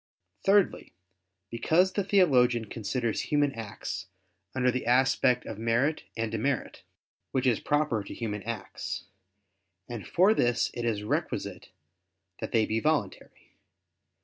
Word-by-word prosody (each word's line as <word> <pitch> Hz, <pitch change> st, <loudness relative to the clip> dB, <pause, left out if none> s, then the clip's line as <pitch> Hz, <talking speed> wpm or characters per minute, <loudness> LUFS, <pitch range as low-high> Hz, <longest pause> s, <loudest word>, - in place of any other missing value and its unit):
Thirdly, 195 Hz, -1 st, +2 dB, 0.6 s
because 160 Hz, +11 st, +2 dB
the 200 Hz, -, 0 dB
theologian 125 Hz, -, +4 dB
considers 115 Hz, +2 st, -2 dB
human 145 Hz, -2 st, +1 dB
acts 105 Hz, -5 st, -6 dB, 0.5 s
under 125 Hz, -1 st, +3 dB
the 130 Hz, -1 st, -3 dB
aspect 125 Hz, 0 st, +3 dB
of 105 Hz, -, -6 dB
merit 120 Hz, +7 st, +1 dB
and 115 Hz, -1 st, -1 dB
demerit, 115 Hz, +4 st, -2 dB, 0.5 s
which 130 Hz, -1 st, +1 dB
is 120 Hz, -4 st, +3 dB
proper 145 Hz, -8 st, 0 dB
to -, -, -7 dB
human 105 Hz, -3 st, -3 dB
acts; 115 Hz, -2 st, -5 dB, 0.8 s
and 115 Hz, -4 st, -6 dB
for 190 Hz, +5 st, +4 dB
this 120 Hz, -, +1 dB
it 120 Hz, -1 st, -4 dB
is 105 Hz, -3 st, -1 dB
requisite 105 Hz, -, -3 dB, 0.7 s
that -, -, -5 dB
they 110 Hz, -2 st, +3 dB
be 110 Hz, -, 0 dB
voluntary. 145 Hz, -9 st, -2 dB
120 Hz, 125 wpm, -28 LUFS, 115-145 Hz, 0.8 s, theologian